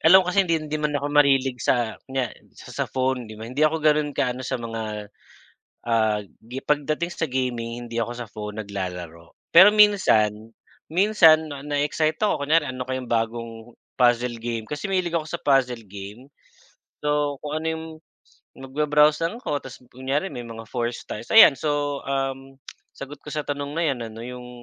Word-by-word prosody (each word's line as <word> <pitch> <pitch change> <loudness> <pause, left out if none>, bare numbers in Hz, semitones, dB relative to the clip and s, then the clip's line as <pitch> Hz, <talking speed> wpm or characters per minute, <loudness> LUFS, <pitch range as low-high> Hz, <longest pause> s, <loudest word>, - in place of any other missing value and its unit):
alam 185 +3 +7
mo 180 - -2
kasi 200 - +4
hindi 170 -3 +2
hindi 155 -1 -4
man 150 -1 0
ako 145 +1 -3
mahilig 135 -4 +3
sa 120 -3 +1 0.2
kunya 130 -3 -2 0.2
sa - - -12
sa - - -1
phone 130 -3 -1
'di 110 - -10
ba? 110 - -8
Hindi 125 +6 -5
ako 155 0 +2
ganon 150 -1 +2
ka-ano 125 -1 0
sa 130 - -2
mga, 110 -3 -6 0.8
ah, 110 -2 +2
gi 115 +6 -10
pagdating 150 +3 0
sa 170 -1 -2
gaming 120 -3 -3
hindi 115 - -5
ako 115 +1 -1
sa 120 -3 -7
phone 105 0 -6
naglalaro. 90 -4 -7 0.2
Pero 190 +5 +8
minsan 115 - +3 0.4
minsan 165 -5 +5
'no 145 - -6
na-eexcite 150 +3 0
akon 205 -9 +1
kunyari 150 -1 +2
ano 130 -1 -5
kayong 130 -1 -4
bagong 115 0 -3 0.2
puzzle 120 -1 +2
game, 115 -1 -5
kasi 150 +7 -4
mahilig 180 -3 0
ako 155 - -4
sa 155 - -6
puzzle 130 -4 +2
game. 105 +7 -10 0.7
So, 145 -1 0
kung 150 +1 -3
ano - - -6
yung 160 0 -6 0.7
mag-ba-browse 150 +3 +2
lang 230 +8 -7
ako 145 - -1
'tas 130 -2 -12
kunyari 135 +8 -2
may 120 -1 -7
mga 115 -1 -10
4 120 -1 -2
stars 110 0 -8
ayan, 155 -11 +9
so, 145 -2 -1
um 135 0 -3 0.4
sagot 140 +1 -9
ko - - -33
sa 150 0 -3
tanong 145 0 -4
na 165 - 0
yan 120 -3 -4
anon 115 +1 -9
yung 125 0 -8
135 Hz, 180 wpm, -24 LUFS, 115-150 Hz, 0.8 s, ayan